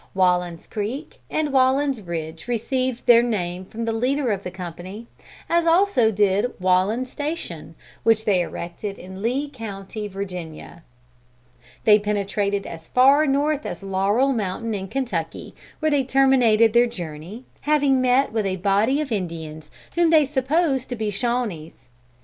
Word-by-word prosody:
Wallen's 180 -2 +1
Creek 235 +8 -5
and 300 -3 -1
Wallen's 265 -1 +2
Ridge 165 -2 -6
received 255 +1 -1
their 235 -1 +7
name 185 -6 -2
from 230 +4 -5
the 225 - -1
leader 255 +2 0
of 195 -2 -1
the 180 - -5
company; 185 +4 -8 0.4
as 340 0 +2
also 330 - +4
did 205 +2 +2
Wallen's 190 +8 +1
Station 305 +3 -5 0.3
which 220 -1 +2
they 190 -4 +3
erected 175 +4 -5
in 185 +1 -10
the 190 - -8
Lee 255 +7 -1
county, 215 -5 -7
Virginia. 180 -4 -7 1.0
"They 210 -1 +6
penetrated 200 -1 -1
as 165 -1 -9
far 275 +4 +5
north 290 +2 +1
as - - -6
Laurel 200 +8 +1
Mountain, 220 +1 -2
in 195 -2 -4
Kentucky, 200 -11 -4 0.3
where 310 0 +2
they 285 -2 +3
terminated 250 -5 +4
their 240 +1 +5
journey, 175 +2 -8 0.2
having 280 -3 +3
met 255 +2 +3
with 215 -3 0
a 185 - -1
body 205 +9 +2
of 285 -4 -5
Indians 160 -6 -5 0.2
whom 340 -1 +3
they 315 -2 +5
supposed 275 0 0
to 245 - -3
be 215 -2 -2
Shawnees. 200 - -3
220 Hz, 150 wpm, -23 LUFS, 190-265 Hz, 1.0 s, their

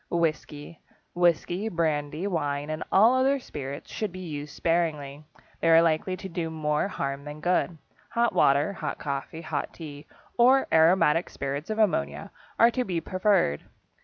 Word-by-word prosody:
=Whisky.= 155 -1 -2 0.3
Whisky, 175 +4 +1
brandy, 155 -1 -1
wine, 145 -5 -2
and 155 - -3
all 220 +5 +6
other 265 +2 +3
spirits 140 - -7
should 215 -3 -3
be 185 - -9
used 150 -5 -6
sparingly. 155 -4 -1 0.3
They 165 - +1
are 165 0 +7
likely 165 +3 0
to 190 - -7
do 170 -2 -3
more 150 0 -1
harm 140 -7 -4
than 150 +1 -8
good. 175 0 0 0.4
Hot 235 0 +2
water, 140 +8 +3
hot - - -4
coffee, 140 +3 -5
hot 155 -2 -4
tea, 150 -3 -9 0.3
or 260 +3 +5
aromatic 165 0 +4
spirits 140 +4 -5
of 215 - -2
ammonia 70 - 0 0.3
are 230 +1 +6
to 250 +1 -1
be 180 -6 -2
preferred. 185 - +1
165 Hz, 155 wpm, -26 LUFS, 145-185 Hz, 0.4 s, are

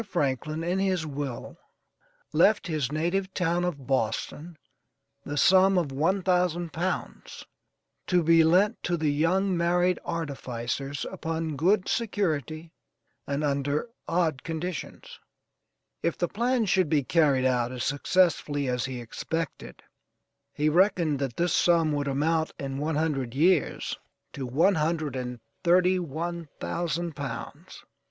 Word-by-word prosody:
Franklin, 155 0 -1
in 180 +3 0
his 185 -4 0
will, 140 -4 -5 0.7
left 200 +7 +4
his 155 -5 -2
native 175 +5 -1
town 175 -1 +1
of 150 -7 -3
Boston, 135 +6 -2 0.7
the 145 - -5
sum 190 +4 +5
of 165 -6 0
one 170 +8 +1
thousand 175 -2 +1
pounds, 180 +3 -4 0.6
to 180 -2 +3
be 165 0 +6
lent 190 +7 +3
to 175 0 -1
the 155 -2 +1
young 180 +6 +1
married 175 +1 +2
artificers 140 -4 -4
upon 165 -4 -3
good 185 +7 +2
security 160 - -2 0.6
and 140 +2 -1
under 145 - -1 0.2
odd 165 -5 0
conditions. 165 0 -6 0.8
If 170 - -1
the 175 - 0
plan 240 +3 0
should 185 -4 +2
be 145 -2 +2
carried 140 -4 +3
out 125 -2 +1
as 125 -1 -4
successfully 145 -1 +1
as 125 -1 -1
he 130 -2 -5
expected, 160 +8 -5 0.7
he 150 - 0
reckoned 170 -3 +3
that 135 -4 -3
this 175 +1 +1
sum 165 -3 +3
would 145 -1 -1
amount 160 +4 0
in 135 -1 -4
one 155 +2 -1
hundred 140 -6 -1
years 170 +2 +1 0.3
to 135 -2 -5
one 160 +11 +3
hundred 155 -3 -1
and 125 -1 -4 0.2
thirty 180 +1 +4
one 170 0 -4
thousand 170 -1 -2
pounds. 140 -1 -7
160 Hz, 130 wpm, -27 LUFS, 140-180 Hz, 0.8 s, be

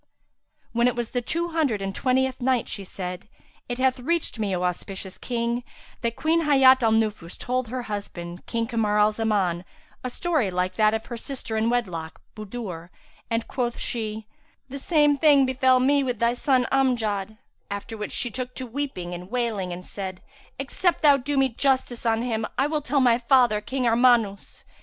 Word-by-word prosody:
When 235 +1 +3
it 250 - +1
was 240 -2 -3
the 245 - -1
Two 340 +7 -2
Hundred 305 -10 0
and 195 0 -3
Twentieth 260 +3 0
Night, 250 -1 +1
She 200 - -5
said, 180 +1 -6 0.4
It 245 - -2
hath 260 0 +2
reached 330 -2 -1
me, 200 -3 0
O 180 - -2
auspicious 190 +1 -4
King, 235 0 -2 0.4
that 235 -1 -1
Queen 325 +2 +2
Hayat 265 -4 +6
al 225 -2 +3
Nufus 215 -6 0
told 255 0 -2
her 250 +2 -4
husband, 180 -5 -6
King 230 -1 -1
Kamar 225 -3 0
al 210 +1 +5
Zaman, 205 -6 0 0.4
a 255 - -2
story 305 - 0
like 180 0 -1
that 215 +2 +3
of 220 - -4
her 235 - -6
sister 245 -2 -4
in 220 +1 +1
wedlock, 180 -10 -2 0.2
Budur, 200 -6 -7 0.4
and, 230 -1 -1
quoth 240 -2 -2
she, 220 -2 -3 0.4
"The 275 +2 -6
same 295 -1 +3
thing 285 -3 +6
befel 260 0 +3
me 280 +2 +3
with 250 -3 -2
thy 235 +2 +2
son 255 0 +2
Amjad;" 220 -6 0 0.3
after 200 +3 -5
which 210 -1 -5
she 245 - -2
took 250 +1 -5
to 260 - -5
weeping 235 -9 -4
and 180 +1 -8
wailing 225 -6 -1
and 175 +1 -7
said, 190 -2 -6 0.3
"Except 330 +7 -1
thou 290 -2 +7
do 280 +2 -3
me 270 0 +4
justice 255 -1 0
on 225 +1 +2
him 225 -3 -1
I 270 - +3
will 300 0 -1
tell 285 -1 +1
my 240 -2 +4
father, 240 -4 +4
King 260 +4 -3
Armanus." 230 -4 +2
235 Hz, 185 wpm, -25 LUFS, 210-260 Hz, 0.4 s, thou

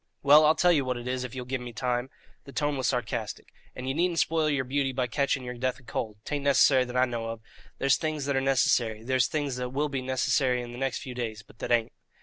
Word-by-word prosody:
"Well, 150 +2 +7
I'll 155 - +5
tell 175 +2 +4
you 150 -5 +3
what 130 -1 -2
it 120 +1 -7
is 130 0 -2
if 125 0 -7
ye'll 125 -1 -5
give 130 0 -3
me 120 -1 -7
time" 125 +2 -1 0.4
the 140 - -10
tone 145 +1 -1
was 130 -2 -1
sarcastic 125 -4 -3 0.3
"and 125 - -6
you 130 - 0
needn't 170 +2 0
spoil 160 -1 +2
yer 140 -3 +1
beauty 135 +1 0
by 130 -1 -1
catching 135 +2 0
yer 125 0 -5
death 130 +1 -2
of 130 - -21
cold. 110 -2 -4
'Tain't 145 -1 -3
nicessary, 135 -2 +5
that 125 0 -4
I 130 - +5
know 120 -2 -4
of. 115 0 -5 0.4
There's 135 -1 +3
things 155 -3 -2
that 140 -1 0
are 135 - +2
nicessary; 120 -4 +2
there's 130 -1 +2
things 145 -2 -2
that 125 0 -3
will 145 +4 -1
be 135 -2 -2
nicessary 130 0 +1
in 120 - -8
the 120 - -8
next 135 -1 -2
few 130 -3 -6
days; 110 -3 -4
but 105 - -21
that - - -4
ain't." 115 -1 +2
130 Hz, 260 wpm, -28 LUFS, 125-140 Hz, 0.4 s, Well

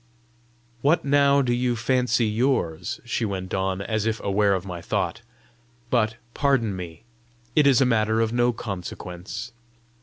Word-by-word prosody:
"What 150 +3 +2
now 140 0 +4
do 120 -2 +1
you 120 0 +1
fancy 120 0 +1
yours?" 105 - 0
she 120 -1 -1
went 95 -3 -3
on, 95 0 -1
as 110 0 -1
if 110 -1 -1
aware 100 0 +2
of 95 0 -4
my 90 -3 -6
thought. - - -2 0.7
"But, 115 -2 +2 0.2
pardon 135 -8 +1
me, 90 +1 -8 0.5
it 150 -2 +5
is 135 -2 +5
a - - +5
matter 110 -2 +2
of 115 0 +1
no 120 0 +3
consequence." 95 -2 -6
110 Hz, 150 wpm, -24 LUFS, 95-125 Hz, 0.7 s, it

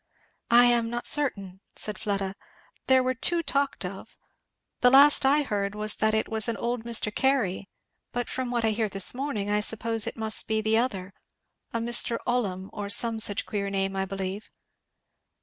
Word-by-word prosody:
"I 240 +1 +6
am 235 -1 +2
not 240 +1 -4
certain," 200 -11 0 0.2
said 210 -3 -5
Fleda, 195 -2 -2 0.5
"there 260 -1 +4
were 255 0 0
two 335 +7 +3
talked 280 - -1
of 190 +4 -9 0.6
the 250 - +5
last 275 +1 +6
I 295 +2 +3
heard 205 -5 -3
was 215 0 -1
that 220 0 +1
it 220 - 0
was 220 -2 +1
an 230 - -2
old 235 -1 -3
Mr. 225 -2 0
Carey; 225 -8 0 0.4
but 245 0 -3
from 260 -1 -4
what 240 -2 -1
I 220 - +2
hear 215 0 -1
this 195 -1 +1
morning 245 -6 -3
I 210 - +2
suppose 225 +1 +1
it - - -5
must 220 -1 0
be 220 0 0
the 220 0 +1
other 195 -6 -3 0.6
a - - -2
Mr. 235 0 +2
Ollum, 200 -6 -2
or 205 -1 -5
some 225 +2 0
such 205 -2 0
queer 200 -1 -3
name, 195 0 -2
I 190 0 -1
believe." 195 +1 -5
220 Hz, 185 wpm, -26 LUFS, 200-245 Hz, 0.6 s, I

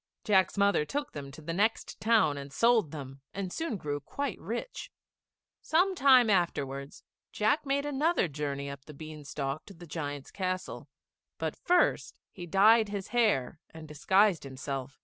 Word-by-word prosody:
Jack's 195 -2 +3
mother 200 -5 +3
took 285 - -4
them 140 -2 -7
to 150 +3 -12
the 165 +2 -4
next 215 +5 0
town 215 -8 +3
and 140 0 -8
sold 230 +1 +3
them, 135 -2 -8
and 190 -2 -4
soon 320 -9 -2
grew 145 -4 -3
quite 275 - -4
rich. 235 - -5 0.7
Some 360 +5 +2
time 265 -7 +6
afterwards 140 -8 -1 0.3
Jack 220 +8 +1
made 280 +1 0
another 290 - +1
journey 140 -2 -4
up 140 -1 -8
the 150 - -11
bean 155 0 -9
stalk 140 0 -4
to 195 - -12
the 175 +1 -12
giant's 145 -3 -5
castle; 185 -1 -4 0.5
but - - -3
first 360 0 +1
he 175 -2 -9
dyed 215 +4 +5
his 200 -1 -5
hair 210 - +1
and 160 -1 -11
disguised 190 +5 +2
himself. 135 0 -6
180 Hz, 160 wpm, -30 LUFS, 145-225 Hz, 0.7 s, time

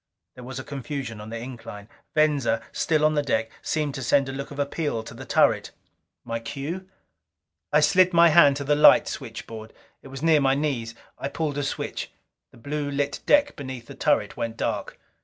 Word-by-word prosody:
There 125 - -11
was 130 +1 -7
a 135 - -5
confusion 135 -5 -5
on 105 - -9
the 115 - -5
incline. 115 -4 -9 0.3
Venza, 145 -7 +2
still 155 -2 +1
on 155 - +3
the 150 - +2
deck, 115 -5 -1
seemed 150 -3 -1
to 135 - -5
send 135 +3 +2
a - - -4
look 140 +1 -6
of 145 - -10
appeal 145 -4 -2
to - - -10
the - - -9
turret. - - +3 0.6
My 115 -1 -3
cue? 150 +11 -6 0.8
I - - +5
slid 185 -1 +5
my 170 -1 +6
hand 150 -3 +6
to 140 - -4
the 145 +1 +2
light 150 0 +7
switchboard. 115 -3 -7 0.3
It - - -13
was 135 +2 -8
near 160 -2 +5
my 135 0 +3
knees. 130 -6 -2 0.2
I - - -2
pulled 145 -1 -2
a - - -1
switch. 135 - -4 0.4
The - - -19
blue 145 +4 -3
lit 140 0 -2
deck 290 0 +4
beneath 130 -4 -7
the - - -10
turret - - +1
went 115 -1 -4
dark. - - -3
140 Hz, 195 wpm, -25 LUFS, 120-150 Hz, 0.8 s, light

